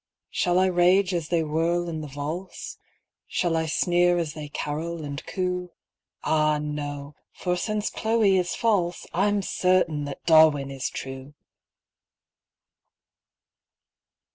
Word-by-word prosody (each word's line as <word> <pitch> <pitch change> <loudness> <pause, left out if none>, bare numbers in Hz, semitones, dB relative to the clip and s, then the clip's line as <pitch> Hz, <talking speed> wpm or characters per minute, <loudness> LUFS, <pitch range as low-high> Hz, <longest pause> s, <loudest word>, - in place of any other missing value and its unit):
Shall 175 -1 +1
I 185 - +5
rage 185 +1 +3
as 170 -3 -2
they 170 -2 +2
whirl 165 +3 0
in 160 -2 -4
the 150 - -6
valse? 150 +7 -6 0.5
Shall 175 -3 0
I 160 0 0
sneer 175 +2 +2
as 165 -4 -2
they 150 -2 -7
carol 155 +3 -4
and 140 0 -6
coo? 180 -1 -2 0.5
Ah 155 -1 +2
no! 145 -1 -5 0.2
for 180 -1 -1
since 210 +3 -2
Chloe 220 -3 +2
is 180 -1 -1
false, 185 -7 0
I'm 200 +2 +1
certain 180 -6 +1
that 140 -1 -8
Darwin 155 -4 +5
is 135 -1 -3
true 135 +2 -8
170 Hz, 125 wpm, -25 LUFS, 150-180 Hz, 0.5 s, I